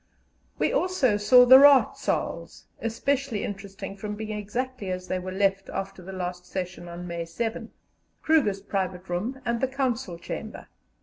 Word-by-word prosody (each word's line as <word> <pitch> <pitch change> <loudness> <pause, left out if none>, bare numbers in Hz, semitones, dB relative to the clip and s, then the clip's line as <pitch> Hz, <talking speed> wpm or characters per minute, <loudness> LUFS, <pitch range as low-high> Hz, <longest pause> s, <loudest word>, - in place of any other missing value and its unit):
We - - +1
also 365 - +2
saw 250 +5 +7
the 260 +2 +10
Raad 280 -1 +7
Saals - - -3 0.2
especially 240 0 -1
interesting 195 0 -6
from 210 +1 -5
being 215 0 -5
exactly 215 +1 -4
as 185 0 -4
they 185 - -1
were 185 +1 -6
left 195 0 0
after 195 -1 -5
the 185 +2 -9
last 180 -1 -4
session 180 -1 -5
on 175 +1 -7
May 170 -1 -4
7 225 +6 -4 0.5
Kruger's 260 -12 +2
private 190 -2 -3
room, 215 +10 -2
and 235 -1 -1
the 265 - +2
Council 255 -8 -2
Chamber. 170 - -7
205 Hz, 160 wpm, -26 LUFS, 185-250 Hz, 0.5 s, the